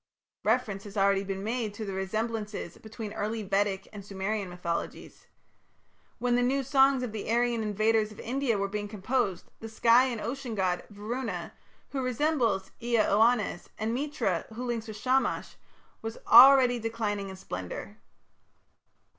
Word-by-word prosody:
Reference 215 -3 0
has 205 +1 -9
already 195 0 +3
been 195 0 -4
made 220 -1 -2
to 215 - -5
the 195 - -4
resemblances 210 0 -3
between 220 -1 -7
early 220 +1 -3
Vedic 195 0 0
and 205 -1 -8
Sumerian 195 0 -3
mythologies. 175 -1 -5 0.9
When 245 0 0
the 245 - +3
"new 270 +3 +1
songs" 270 -1 +4
of 245 - -3
the 215 -1 -5
Aryan 240 0 +2
invaders 215 +1 +1
of 210 - -13
India 250 -2 -1
were 200 0 0
being 205 +1 -4
composed, 205 -2 -2
the 225 - -7
sky 230 +3 +5
and 245 -4 -3
ocean 245 +1 -4
god, 185 -3 0
Varuna, 210 -3 -5 0.4
who 270 - -2
resembles 250 -7 0
Ea 240 0 0
Oannes, 215 -3 +2
and 220 +1 -2
Mitra, 275 - -1
who 250 +2 -4
links 235 -2 -3
with 215 -1 -7
Shamash, 260 +4 0 0.5
were 225 0 -4
already 250 0 +8
declining 215 -3 -2
in 190 - -7
splendour. 90 - -7
220 Hz, 150 wpm, -29 LUFS, 200-245 Hz, 0.9 s, already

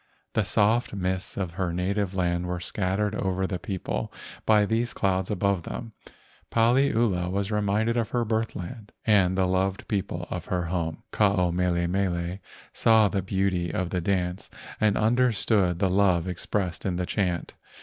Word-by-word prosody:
The - - +2
soft 110 +1 +2
mists 95 -1 -2
of 95 -4 -2
her 90 0 -2
native 95 +2 -1
land 90 -1 0
were 90 0 -2
scattered 95 +3 -1
over 95 -2 -1
the 95 -2 -3
people 95 -1 -3 0.4
by 105 -1 +5
these 115 +3 -1
clouds 95 -2 0
above 100 -2 +1
them. 110 +6 -7 0.6
Paliula 115 -6 +2
was 100 +2 -1
reminded 105 +3 +1
of 115 -2 0
her 120 -1 0
birth 110 +1 -1
land 105 +4 -8
and 95 -4 +4
the 95 - +3
loved 95 +1 0
people 90 -4 -2
of 90 -2 -4
her 90 -1 -1
home. 85 -2 -3
Ke - - -6
ao 95 -4 +4
mele 85 0 +1
mele 90 0 -1 0.3
saw 110 -2 +5
the 95 - -1
beauty 95 -2 0
of 90 0 -2
the 90 - -1
dance 90 0 -1 0.3
and 105 -2 +3
understood 110 -5 +2
the 95 - +2
love 95 -2 +3
expressed 90 0 -2
in 95 -3 -1
the 90 0 -1
chant. 90 -3 -1
95 Hz, 165 wpm, -26 LUFS, 90-105 Hz, 0.6 s, by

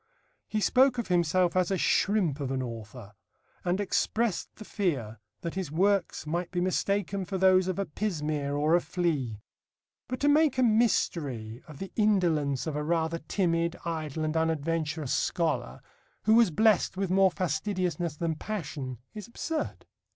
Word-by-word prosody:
He 215 - -1
spoke 255 +3 +4
of 235 - -3
himself 175 0 +2
as 185 -2 +2
a 195 - +1
"shrimp 185 -7 +2
of 140 -2 -3
an 130 -1 -1
author," 115 -2 -8 0.5
and 180 +2 0
expressed 215 +1 0
the 215 - -10
fear 135 - -2 0.2
that 170 - -4
his 185 -6 -4
works 195 +2 +1
might 170 +3 -2
be 180 - -2
mistaken 195 +2 0
for 190 +1 -3
those 185 0 +4
of 185 - -2
"a 200 - 0
pismire 150 -5 -2
or 150 +2 +2
a 175 - +5
flea." 140 - -2 0.6
But 255 0 -4
to 290 - +3
make 295 -2 +4
a 255 - +3
mystery 150 - +1
of 150 -3 -11
the 195 +5 -7
indolence 170 - +2
of 160 -2 -3
a 150 - -1
rather 165 +1 0
timid, 170 0 0
idle, 160 -2 -3
and 155 +1 -2
unadventurous 160 -2 -1
scholar, 135 -7 -1 0.4
who 220 - +4
was 230 -3 +6
blessed 210 +1 +2
with 195 -2 -1
more 190 0 +5
fastidiousness 175 -1 -2
than 165 -1 -1
passion, 150 - -5 0.2
is 210 0 -8
absurd. 310 +6 -4
170 Hz, 160 wpm, -28 LUFS, 150-195 Hz, 0.6 s, was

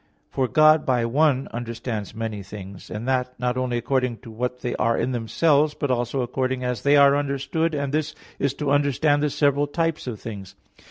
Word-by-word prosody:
For 130 -1 0
God 155 +2 +5
by 125 -3 +1
one 135 +2 +2
understands 115 -3 -5
many 110 -2 -4
things, 100 -1 -10
and 110 +3 -5
that 125 -1 -1
not 125 0 0
only 125 -1 -1
according 125 -1 0
to 115 - -11
what 125 +3 -3
they 120 - -2
are 115 -1 +1
in 130 - 0
themselves, 145 +5 +2
but 145 -3 -1
also 120 +2 -1
according 130 +1 -2
as 125 -4 -2
they 145 +1 +4
are 140 0 +6
understood, 145 +3 -1
and 140 -1 -2
this 155 0 -1 0.2
is 140 -1 0
to 145 -1 -2
understand 145 +1 +2
the 150 - +1
several 145 0 +2
types 165 -1 -2
of 115 -5 -5
things. 100 -5 -8
130 Hz, 195 wpm, -24 LUFS, 120-145 Hz, 0.2 s, are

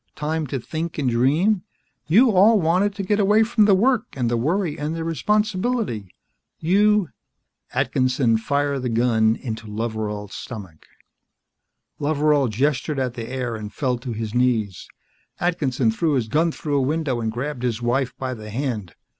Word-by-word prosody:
Time 155 +1 -2
to 135 +1 -3
think 160 +7 -5
and 135 -5 0
dream. 155 - +2 0.5
You 230 +9 +5
all 205 +3 +5
wanted 185 +4 +1
to 200 - -3
get 205 +2 +1
away 210 +2 +4
from 220 -1 +3
the 200 -2 +5
work 240 +3 +2
and 120 -3 -1
the - - +2
worry 160 - 0
and 150 +2 -3
the 165 - -3
responsibility. 210 - 0 0.5
You 205 +1 +3 0.3
" - - -34
Atkinson 130 -3 +2
fired 140 +3 0
the 125 - -2
gun 115 -1 +2
into 110 -4 -6
Loveral's 105 -2 -4
stomach. 95 -10 -9 1.1
Loveral 145 -1 +2
gestured 140 +5 0
at 130 -2 -1
the 115 -2 -6
air 125 -3 -3
and 105 -1 -7
fell 125 0 -1
to 125 0 -6
his 110 -1 -4
knees. 115 -6 0 0.5
Atkinson 140 -9 +1
threw 155 +7 0
his 125 -5 0
gun 160 +7 +2
through 145 -2 -2
a - - +2
window 135 -3 -1
and 110 -1 -1
grabbed 125 +3 -4
his 120 -3 -1
wife 125 +2 -1
by 130 -1 -3
the 110 -3 -9
hand. 110 - -3
135 Hz, 165 wpm, -22 LUFS, 115-170 Hz, 1.1 s, You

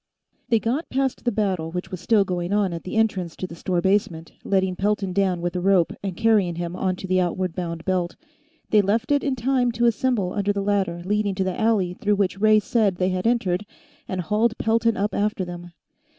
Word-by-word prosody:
They 230 - +4
got 245 +9 -2
past 265 -1 -1
the 240 - +2
battle 190 -7 -1
which 180 +3 -5
was 185 - -5
still 210 +2 +3
going 180 -1 -3
on 200 -3 +1
at 165 - -6
the 185 - -5
entrance 195 -7 0
to - - -4
the 180 - -8
store 175 +1 -1
basement, 180 -4 0
letting 190 -2 +1
Pelton 200 -1 -1
down 185 -2 +1
with 175 +1 -2
a 180 - -1
rope 185 -2 +3
and 190 -3 -4
carrying 210 -6 +3
him 175 +1 -4
onto 185 0 -2
the 185 0 +2
outward 180 0 -1
bound 170 -2 -5
belt. 180 -2 -1 0.6
They 210 - +6
left 215 +6 0
it 285 -1 +3
in 275 -2 0
time 250 0 +1
to 235 +1 +1
assemble 230 -5 +1
under 205 0 0
the 200 0 -2
ladder 195 -4 0
leading 205 0 0
to 190 - 0
the 185 -1 -1
alley 210 -5 +2
through 205 +3 0
which 195 -1 0
Ray 215 0 +6
said 210 -3 +1
they 185 +1 0
had 185 +3 -1
entered, 205 -6 +1 0.4
and 185 -1 -2
hauled 215 +6 +1
Pelton 230 0 +1
up 205 +2 -1
after 205 -2 0
them. 175 0 -8
195 Hz, 215 wpm, -23 LUFS, 180-215 Hz, 0.6 s, They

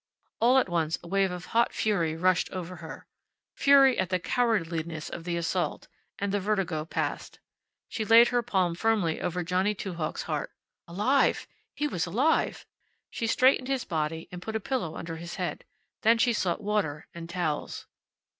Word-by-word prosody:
All 245 +3 +5
at 260 - +3
once 165 -2 0
a - - -10
wave 195 +1 +2
of 180 -1 -6
hot 235 +1 +3
fury 170 -7 0
rushed 185 +1 +2
over 180 -1 -6
her 160 0 -9 0.5
fury 275 -2 +5
at 185 -1 0
the 185 - +1
cowardliness 170 -8 -1
of 170 - -7
the 170 -1 -1
assault 170 -1 -2 0.3
and 200 0 -2
the 205 - +1
vertigo 190 -6 -1
passed. - - -3 0.5
She 220 - -3
laid 230 +2 +7
her 245 -1 +1
palm 190 -7 0
firmly 195 -4 0
over 180 +1 -2
Johnny 185 +4 +1
Two 190 -2 -5
Hawks' 160 -2 -3
heart. - - -3 0.4
Alive! 210 +11 +2 0.3
He 295 - -1
was 180 - -1
alive! 260 - +1 0.5
She 230 - -2
straightened 255 +2 +3
his 270 -2 -1
body 160 0 -2
and 180 0 -7
put 220 +3 -5
a - - +1
pillow 215 -8 -3
under 165 -1 -6
his 170 +1 -7
head. - - -4 0.4
Then 230 0 +5
she 235 +1 +3
sought 190 -1 -1
water 200 -8 -1
and 170 0 -8
towels. 170 -4 -3
185 Hz, 175 wpm, -28 LUFS, 170-225 Hz, 0.5 s, laid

